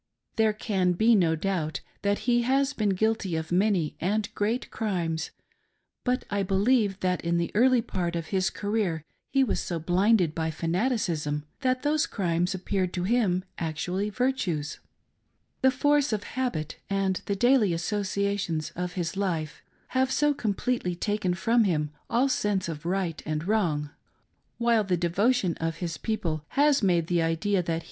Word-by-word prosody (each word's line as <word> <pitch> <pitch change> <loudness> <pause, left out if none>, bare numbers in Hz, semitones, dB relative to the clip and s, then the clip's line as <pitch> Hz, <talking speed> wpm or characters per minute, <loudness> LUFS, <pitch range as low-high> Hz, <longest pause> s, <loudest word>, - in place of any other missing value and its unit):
There 220 -1 +3
can 190 -4 0
be 220 +6 +4
no 170 -6 +3
doubt 160 -2 -2 0.2
that 205 +1 0
he 240 -1 +4
has 270 +3 +2
been 215 -6 0
guilty 220 -4 0
of 160 +1 -4
many 185 -3 +2
and 210 +4 -1
great 220 +4 -1
crimes, 170 -7 -2 0.7
but 250 0 0
I 200 0 +1
believe 200 +1 +2
that 180 -1 0
in 170 0 +1
the 170 0 -1
early 245 +2 +4
part 175 -4 -2
of 165 -1 -4
his 190 -1 +2
career 205 -7 -2 0.2
he 270 0 +3
was 250 - 0
so 170 - -3
blinded 180 +1 +2
by 160 0 -1
fanaticism 165 - -1
that 255 -2 0
those 305 +2 +2
crimes 175 -2 0
appeared 185 -1 -1
to 180 - -2
him 190 -4 +1
actually 180 +5 -2
virtues: 200 - -1 0.4
— - - -47
the 265 - +6
force 290 +2 +2
of 210 -2 -1
habit 210 - -3
and 195 -1 0
the 200 - 0
daily 240 -1 +4
associai 200 +3 -1
tions 160 -5 -2
of 180 0 -4
his 175 0 -3
life 170 -6 -2 0.3
have 260 0 +1
so 295 +1 +3
completely 220 -5 -1
taken 190 -1 -1
from 230 +5 +3
him 150 -5 0 0.2
all 245 +4 +3
sense 205 -8 0
of 165 0 -5
right 180 -3 -1
and 155 +2 -3
wrong; 160 -9 0 0.7
while 235 -2 +3
the 185 -3 0
devotion 185 +3 +2
of 165 0 -2
his 165 -3 -4
people 175 -9 -2
has 285 - +3
made 175 -5 +2
the 170 0 +1
idea 165 +4 +1
that 165 -1 -2
195 Hz, 165 wpm, -27 LUFS, 170-225 Hz, 0.7 s, the